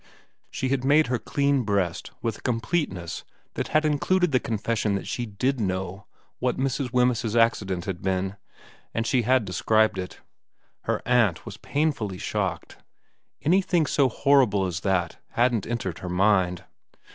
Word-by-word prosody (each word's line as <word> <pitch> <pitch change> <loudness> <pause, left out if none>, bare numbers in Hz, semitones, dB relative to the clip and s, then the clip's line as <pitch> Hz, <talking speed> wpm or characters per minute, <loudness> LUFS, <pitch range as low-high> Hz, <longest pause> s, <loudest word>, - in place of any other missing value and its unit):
She 130 - -2
had 135 -1 0
made 145 +3 +5
her 120 - +1
clean 140 +1 +1
breast 100 -6 -1
with 115 -2 -2
a - - -16
completeness 115 - -2 0.3
that - - -3
had 155 0 +2
included 170 +4 +2
the 130 - +3
confession 110 -2 -1
that 100 - -4
she 120 -1 -3
did 125 +6 -1
know 95 -1 -3 0.3
what 125 0 0
Mrs. 135 -1 -1
Wemyss's 125 -3 +1
accident 100 -6 +2
had 95 -3 -4
been, 95 0 -1 0.6
and 115 - 0
she 125 +1 +2
had 125 0 +2
described 110 +2 +2
it. 90 -3 -6 0.7
Her - - -1
aunt 120 -8 +2
was - - -8
painfully 140 -11 -1
shocked. - - -3 0.7
Any 180 +6 +4
thing 175 -4 +1
so 140 -2 +2
horrible 130 -6 +3
as 90 -2 -3
that 90 -3 -1
hadn't 120 -3 +1
entered 110 -8 -3
her 90 - -6
mind. 90 -1 +2
115 Hz, 155 wpm, -25 LUFS, 95-130 Hz, 0.7 s, made